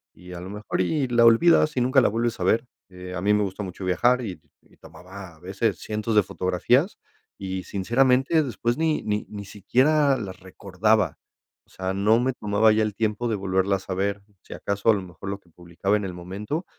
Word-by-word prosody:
y 90 Hz, +1 st, -12 dB
a 85 Hz, -, -7 dB
lo 90 Hz, +2 st, -8 dB
mejor, 105 Hz, -2 st, -3 dB
y 135 Hz, -, 0 dB
la 120 Hz, -1 st, +4 dB
olvidas 155 Hz, +5 st, +5 dB
y -, -, +3 dB
nunca 130 Hz, +2 st, +4 dB
la 120 Hz, -, +3 dB
vuelves 115 Hz, +1 st, -2 dB
a -, -, -2 dB
ver. 115 Hz, +6 st, +2 dB, 0.2 s
Eh, 90 Hz, 0 st, -9 dB
a 90 Hz, -, -4 dB
mí 105 Hz, +1 st, +2 dB
me 105 Hz, -, +2 dB
gusta 100 Hz, +1 st, -4 dB
mucho 95 Hz, 0 st, -7 dB
viajar, 120 Hz, +8 st, +2 dB
y 90 Hz, -7 st, -6 dB, 0.2 s
y -, -, -26 dB
tomaba 95 Hz, -1 st, -12 dB
a -, -, -23 dB
veces 100 Hz, +4 st, -2 dB
cientos 110 Hz, +1 st, -3 dB
de 105 Hz, -, +7 dB
fotografías, 95 Hz, -, 0 dB, 0.4 s
y, 95 Hz, -1 st, -4 dB
sinceramente, 130 Hz, -, +2 dB
después 120 Hz, 0 st, -2 dB
ni 160 Hz, -1 st, 0 dB
ni 105 Hz, 0 st, -2 dB
ni 100 Hz, -1 st, -7 dB
siquiera 135 Hz, +8 st, +2 dB
las 95 Hz, -5 st, -7 dB
recordaba. 100 Hz, +3 st, 0 dB, 0.5 s
O -, -, -33 dB
sea, 95 Hz, 0 st, -3 dB
no 105 Hz, +4 st, +3 dB
me 130 Hz, +1 st, 0 dB
tomaba 105 Hz, 0 st, +2 dB
ya 110 Hz, 0 st, +2 dB
el 105 Hz, -1 st, -2 dB
tiempo 110 Hz, +2 st, -1 dB
de 110 Hz, -, 0 dB
volverlas 95 Hz, 0 st, -1 dB
a -, -, -1 dB
ver, 100 Hz, +1 st, -1 dB, 0.2 s
si -, -, -10 dB
acaso 100 Hz, +3 st, -2 dB
a -, -, +7 dB
lo 100 Hz, -, -2 dB
mejor 90 Hz, +2 st, -9 dB
lo 100 Hz, 0 st, -4 dB
que 90 Hz, -, -28 dB
publicaba 85 Hz, +4 st, -2 dB
en 105 Hz, -, -4 dB
el 90 Hz, -, -5 dB
momento 100 Hz, -, -5 dB
105 Hz, 215 wpm, -24 LUFS, 95-120 Hz, 0.5 s, de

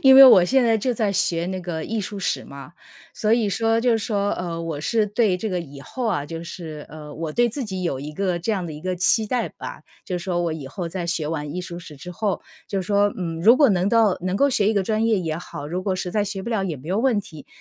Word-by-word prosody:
因 265 Hz, -2 st, +8 dB
为 270 Hz, -, +12 dB
我 190 Hz, -9 st, +9 dB
现 260 Hz, +6 st, +3 dB
在 225 Hz, -1 st, +3 dB
就 245 Hz, +4 st, 0 dB
在 210 Hz, -3 st, 0 dB
学 170 Hz, -2 st, +1 dB
那 185 Hz, 0 st, -3 dB
个 165 Hz, -3 st, -4 dB
艺 225 Hz, 0 st, -2 dB
术 205 Hz, +1 st, -5 dB
史 150 Hz, -7 st, -1 dB
嘛， 140 Hz, +3 st, -11 dB, 0.4 s
所 215 Hz, -, -1 dB
以 225 Hz, -3 st, +2 dB
说， 225 Hz, +2 st, +2 dB
就 245 Hz, +2 st, +2 dB
是 225 Hz, -, +2 dB
说， 205 Hz, -2 st, 0 dB
呃， 170 Hz, -2 st, -3 dB
我 160 Hz, -3 st, -4 dB
是 215 Hz, +6 st, +1 dB
对 205 Hz, -3 st, +2 dB
这 220 Hz, +4 st, -3 dB
个 180 Hz, -1 st, -1 dB
以 140 Hz, -3 st, -10 dB
后 250 Hz, -, -4 dB
啊， 165 Hz, -10 st, 0 dB
就 165 Hz, +2 st, -6 dB
是， 160 Hz, -4 st, -8 dB
呃， 150 Hz, -1 st, -10 dB
我 160 Hz, 0 st, -4 dB
对 240 Hz, +5 st, +3 dB
自 265 Hz, +3 st, -4 dB
己 190 Hz, -4 st, -4 dB
有 140 Hz, -7 st, -1 dB
一 150 Hz, +2 st, -6 dB
个 185 Hz, 0 st, -1 dB
这 175 Hz, +6 st, -2 dB
样 195 Hz, -4 st, -1 dB
的 165 Hz, -, -5 dB
一 150 Hz, -, -8 dB
个 185 Hz, +1 st, -2 dB
期 205 Hz, +5 st, +3 dB
待 245 Hz, +2 st, -1 dB
吧， -, -, -8 dB, 0.2 s
就 180 Hz, -, -2 dB
是 175 Hz, -, -6 dB
说 175 Hz, -2 st, 0 dB
我 170 Hz, -, -1 dB
以 145 Hz, -4 st, -7 dB
后 170 Hz, +5 st, -5 dB
在 170 Hz, 0 st, -4 dB
学 165 Hz, -3 st, -1 dB
完 150 Hz, -1 st, -4 dB
艺 180 Hz, -, -2 dB
术 175 Hz, -1 st, -6 dB
史 160 Hz, -4 st, -11 dB
之 180 Hz, +6 st, -9 dB
后 200 Hz, +2 st, -1 dB, 0.3 s
就 195 Hz, -2 st, -2 dB
说， 205 Hz, +2 st, +2 dB
嗯， 165 Hz, -2 st, -3 dB
如 230 Hz, +5 st, +8 dB
果 285 Hz, -4 st, +6 dB
能 185 Hz, -2 st, +2 dB
到 220 Hz, -3 st, +4 dB
能 185 Hz, +1 st, -1 dB
够 280 Hz, +4 st, +4 dB
学 210 Hz, -6 st, +2 dB
一 -, -, +3 dB
个 200 Hz, -2 st, +2 dB
专 215 Hz, +3 st, 0 dB
业 220 Hz, -3 st, +3 dB
也 160 Hz, -3 st, -2 dB
好， 145 Hz, -4 st, -7 dB
如 175 Hz, +4 st, -3 dB
果 190 Hz, 0 st, 0 dB
实 180 Hz, -1 st, -3 dB
在 210 Hz, +1 st, +1 dB
学 195 Hz, -1 st, -4 dB
不 235 Hz, -, -5 dB
了 220 Hz, -4 st, 0 dB
也 170 Hz, -5 st, -3 dB
没 140 Hz, +5 st, -11 dB
有 190 Hz, +4 st, +1 dB
问 235 Hz, -4 st, +2 dB
题。 155 Hz, -6 st, -12 dB
185 Hz, 305 characters per minute, -23 LUFS, 165-215 Hz, 0.4 s, 为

